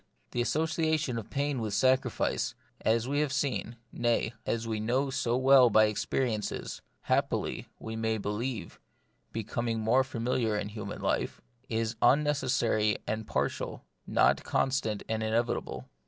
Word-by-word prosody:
The 120 - 0
association 155 -2 0
of 110 - -9
pain 140 -2 -1
with 105 -2 -2
sacrifice, 130 +5 +1 0.3
as 115 +2 +2
we 145 +2 0
have 150 -2 +1
seen 130 -5 -1
— - - -41
nay, 120 -1 0
as 115 0 -1
we 110 -1 -1
know 130 +5 0
so 125 -2 0
well 130 -1 +7
by 110 0 +6
experiences, 110 +1 -2 0.2
happily, - - 0
we 110 0 -6
may 110 0 0
be 105 - -3
lieve, 115 +1 -4 0.5
becoming 115 +1 -2
more 115 +5 +3
familiar 115 -3 -1
in 105 - -3
human 105 0 -6
life - - -1 0.2
— 120 - -41
is 115 -1 -1
unnecessary 125 -6 +3
and 110 0 -3
partial, - - -2 0.2
not - - +3
constant 120 -6 0
and 110 0 -1
inevitable. 110 - -1
115 Hz, 145 wpm, -30 LUFS, 110-130 Hz, 0.5 s, well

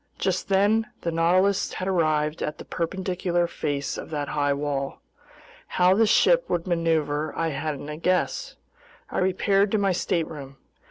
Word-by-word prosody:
Just 190 0 -1
then 205 +3 +3
the 170 - -2
Nautilus 185 +4 +2
had 185 - -4
arrived 155 -4 +1
at 150 - -3
the - - -10
perpendicular 180 0 -1
face 145 -4 -3
of - - -8
that 145 -3 -3
high 145 -1 +1
wall. 140 -1 -2 0.8
How 180 +1 +5
the 220 +3 +3
ship - - +4
would 170 - -1
maneuver 160 -4 0
I 165 0 0
hadn't 145 0 -4
a 150 0 -6
guess. 185 - 0 0.6
I - - -1
repaired 195 +2 +2
to - - +4
my 200 -2 +2
stateroom. 155 -7 -3
170 Hz, 155 wpm, -25 LUFS, 150-190 Hz, 0.8 s, How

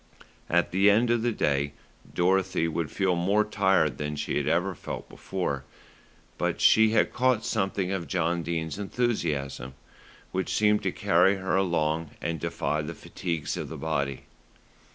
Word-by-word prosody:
At 85 +1 +2
the 95 +3 +5
end 115 +4 +4
of 120 -1 +2
the 120 +1 +1
day 70 -7 0 0.4
Dorothy 95 -1 +1
would 80 -1 -2
feel 95 -2 +1
more 100 +5 +2
tired 95 -8 +2
than 75 0 -3
she 75 - -3
had 70 - -1
ever 90 +4 +1
felt - - -7
before; 70 -8 -3 0.8
but - - -1
she 110 0 +6
had 110 - +2
caught 125 -3 +2
something 95 -4 -1
of 90 -4 -3
John 85 +2 0
Dene's 80 +2 -3
enthusiasm, 80 - -2 0.6
which 95 0 -2
seemed 105 0 +3
to - - -1
carry 90 +4 +3
her 95 -1 -1
along 80 -4 0
and 85 -1 -3
defy 75 +2 -1
the 80 +2 -6
fatigues 85 -2 -4
of - - -5
the - - -6
body. 70 -4 -2
90 Hz, 155 wpm, -27 LUFS, 80-100 Hz, 0.8 s, she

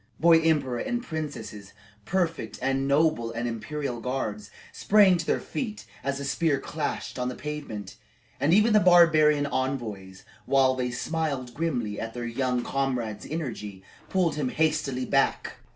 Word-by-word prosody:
Boy 165 0 +6
emperor 145 -7 +1
and 240 - -2
princesses, 145 - -6 0.3
prefect 175 -3 -1
and 135 +1 0
nobles 140 -5 +2
and 120 +1 -2
imperial 125 +2 -4
guards, 110 -5 -3 0.2
sprang 200 -3 +5
to 165 - -4
their - - +2
feet 215 -5 -5 0.2
as 135 0 -1
the 140 - -5
spear 145 0 +1
clashed 150 -2 -4
on 125 0 -1
the 125 - -5
pavement, 145 -10 -6 0.4
and 145 +4 +2
even 215 +4 +5
the 215 - +7
barbarian 155 -5 +5
envoys, 115 -9 -4 0.2
while 135 -1 +4
they 125 -1 -2
smiled 135 -1 -3
grimly 120 -9 -2
at 115 +1 -5
their 120 -1 -4
young 125 +1 -1
comrade's 125 -6 -2
energy, 115 - -5 0.3
pulled 180 -5 +1
him 140 -4 0
hastily 150 -4 0
back. - - 0
135 Hz, 150 wpm, -27 LUFS, 120-160 Hz, 0.4 s, the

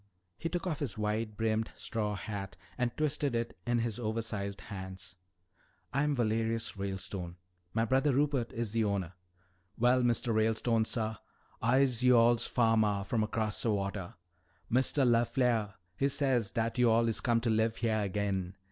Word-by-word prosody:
He 165 - -2
took 175 +1 -3
off 160 -6 -2
his 130 -9 -3
wide 105 0 -2
brimmed 110 0 0
straw 105 -2 -2
hat 100 -2 -5 0.2
and 125 -1 0
twisted 150 -3 0
it 115 0 -2
in 120 0 +2
his 115 -1 -1
oversized 110 -3 -3
hands. 95 -2 -8 0.7
"I'm 145 +2 +1
Valerius 115 -1 0
Ralestone. 95 -2 -4 0.4
My 115 0 +2
brother 135 +4 +2
Rupert 135 -3 +1
is 115 -2 -3
the 115 0 +1
owner." 100 -4 -1 0.6
"Well, 125 +2 +4
Mistuh 120 -1 +1
Ralestone, 110 +1 +2
suh, 110 -1 -2 0.4
I'se 125 0 +3
yo'all's 120 -1 +5
fahmah 110 -4 +2
from 110 +1 0
'cross 110 -1 -1
wata. 100 -4 -2 0.6
Mistuh 130 +3 +2
LeFleah, 120 -3 +2 0.2
he 140 +9 +1
says 130 -7 +1
dat 115 +3 -2
yo'all 115 -1 +4
is 115 - 0
come 120 -3 +2
to 115 -1 +1
live 110 +1 +2
heah 110 -3 0
agin. 95 -2 -2
115 Hz, 145 wpm, -31 LUFS, 105-120 Hz, 0.7 s, yo'all's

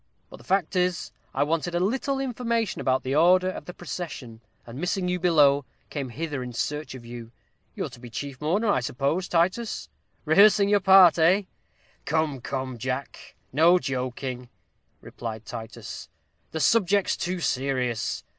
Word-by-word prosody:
But - - -10
the - - -16
fact 190 -1 0
is, 180 -1 0 0.2
I - - +1
wanted 165 +3 -1
a - - +2
little 265 +8 0
information 235 -4 -1
about 130 0 +1
the 130 - -2
order 185 +4 +4
of - - -8
the 180 - -8
procession, 145 -10 -7 0.2
and 120 +3 -9
missing 180 +2 -1
you 180 0 -1
below, 145 -5 +4 0.3
came 140 -4 -4
hither 145 +1 -4
in 125 -1 -6
search 150 +3 -3
of 120 -2 -11
you. 120 -1 -9 0.4
You're - - -3
to - - -13
be 120 0 -10
chief 140 +3 -6
mourner, 200 +8 +1
I - - +2
suppose, 140 +9 -1
Titus 185 +7 0 0.4
rehearsing 200 +5 +6
your 205 0 +4
part, 190 -3 +7
eh?" 180 +6 +4 0.6
"Come, 155 -4 0
come, 130 -2 -4
Jack, 130 +3 -5 0.2
no 165 +5 +6
joking," 130 -3 -4 0.5
replied 110 -2 -7
Titus; 115 -2 -8 0.4
"the 160 - -4
subject's 200 +3 +3
too 180 +1 -3
serious. 130 -6 -1
160 Hz, 155 wpm, -26 LUFS, 130-185 Hz, 0.6 s, part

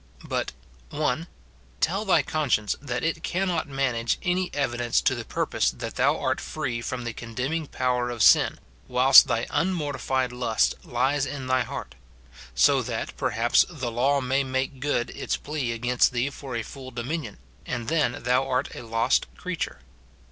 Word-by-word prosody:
But, - - -2 0.2
— 60 0 -28
[1.] 150 +2 -1 0.5
Tell 195 +6 0
thy 190 - +4
conscience 130 -9 0
that 125 -4 -3
it 165 0 -1
cannot 180 -2 -1
manage 130 -4 0
any 180 +1 0
evidence 120 -4 0
to - - +2
the - - -4
purpose - - 0
that - - -6
thou - - +2
art - - -1
free 120 -2 -3
from 125 +1 -4
the 120 -1 -4
con 115 0 -9
demning 150 +5 -2
power 125 -1 0
of 120 -3 -1
sin, - - +6 0.3
whilst 130 +2 +8
thy 115 +1 0
unmortified 145 -7 0
lust 125 -3 +1
lies 135 +4 0
in 140 -3 -5
thy 130 0 +2
heart; 110 - -5 0.6
so - - +5
that, - - -4
perhaps, 115 +2 +3
the 130 -9 -4
law 135 +4 +2
may 130 +2 +1
make 130 0 -2
good 135 -3 -1
its - - -2
plea 145 -5 -3
against 120 +2 +2
thee 125 +3 0
for 135 -3 -7
a 115 - -2
full 130 +2 -9
dominion, 125 0 -4 0.3
and 120 -3 -3
then 150 -6 0
thou 125 +2 +2
art 130 +1 0
a - - -7
lost 115 -1 +1
creature. - - -4
130 Hz, 170 wpm, -26 LUFS, 120-145 Hz, 0.6 s, whilst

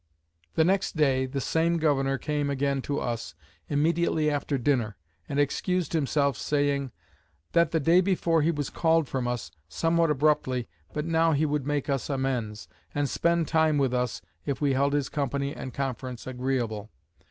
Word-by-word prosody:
The 160 - +4
next 190 0 +1
day, 130 -3 +3
the 135 +1 -3
same 165 +5 +1
governor 135 -4 +1
came 145 0 -1
again 140 0 0
to 145 - 0
us, 115 -7 -4 0.3
immediately 155 +1 +2
after 145 -1 -1
dinner, 120 -5 0 0.3
and 140 - -1
excused 180 +5 0
himself, 140 -3 +1
saying; 145 -2 0 0.6
"That 170 -1 +4
the 160 - +1
day 165 +5 +5
before 170 -3 +2
he 155 - +2
was 145 -4 -2
called 165 -2 +2
from 130 -2 -2
us, 120 -2 -3 0.2
somewhat 165 - +2
abruptly, 135 -4 +1 0.2
but 150 0 -3
now 165 0 +3
he 150 +2 +2
would 145 -2 -1
make 145 -2 -1
us 140 -1 -1
amends, 125 -6 -2 0.3
and 145 0 +1
spend 170 +2 +1
time 160 -2 +3
with 135 -3 +1
us 125 -2 -1 0.2
if 140 -2 -2
we 145 -2 +2
held 140 +2 +2
his 145 -2 +1
company 140 0 -2
and 130 - -6
conference 130 -2 -4
agreeable." 125 -5 -2
145 Hz, 165 wpm, -27 LUFS, 130-160 Hz, 0.6 s, day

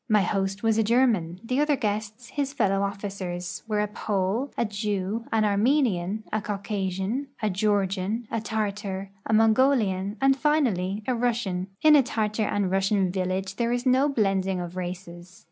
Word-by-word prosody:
My 210 -1 +5
host 195 +2 -1
was 225 -1 +3
a - - +4
German; 215 -7 +2
the 255 +4 -1
other 295 0 +3
guests, 215 0 -3
his 280 -1 -2
fellow 195 -7 +1
officers, 195 -3 -4
were 210 -1 0
a 210 - 0
Pole, 205 +5 -1
a 235 - +1
Jew, 210 +1 -2
an 220 -1 +2
Armenian, 210 -3 +1
a 215 - +1
Caucasian, 200 +4 -3
a 215 -2 0
Georgian, 200 +2 0
a 225 - -1
Tartar, 205 -3 -3 0.2
a - - -2
Mongolian, 220 -3 +3
and, 270 0 +4
finally, 220 - +1
a 255 - +1
Russian, 230 -7 -1 0.2
In 310 -1 +8
a 290 - +7
Tartar 215 -3 -1
and 200 -3 0
Russian 195 -1 +2
village 190 +1 -2
there 235 -1 0
is 245 +1 -1
no 260 +3 +4
blending 195 -6 +1
of 175 0 -6
races. 180 0 -7
210 Hz, 160 wpm, -26 LUFS, 190-230 Hz, 0.2 s, In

